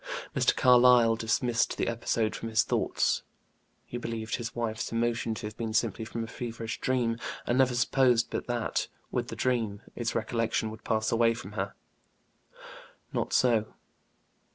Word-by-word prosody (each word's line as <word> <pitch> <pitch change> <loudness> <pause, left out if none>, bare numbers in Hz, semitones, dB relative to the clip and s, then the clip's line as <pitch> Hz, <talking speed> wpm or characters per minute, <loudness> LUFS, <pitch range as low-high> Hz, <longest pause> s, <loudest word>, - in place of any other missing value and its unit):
Mr. - - +3
Carlyle 125 -2 +6
dismissed 115 +1 0
the - - 0
episode 115 -1 0
from 115 - -5
his 110 0 +3
thoughts; - - +1 0.6
he 120 - -5
believed 115 -1 -3
his 115 -1 -5
wife's 115 -2 -2
emotion 115 0 0
to 110 - -6
have 105 0 -6
been 110 -2 -3
simply 115 -1 +1
from 115 +1 -4
a - - -5
feverish 115 -1 -5
dream, 120 -3 0 0.3
and 120 +2 +1
never 130 -2 +4
supposed 120 0 +3
but - - -3
that, 120 -2 -1 0.2
with - - -1
the - - -6
dream, 115 -6 -1
its 120 -1 -2
recollection 115 -1 0
would 110 - -11
pass 110 0 0
away 115 0 +3
from 105 -3 -8
her. 95 -2 -3 1.4
Not - - -1
so. 115 -4 +2
115 Hz, 155 wpm, -29 LUFS, 110-120 Hz, 1.4 s, Carlyle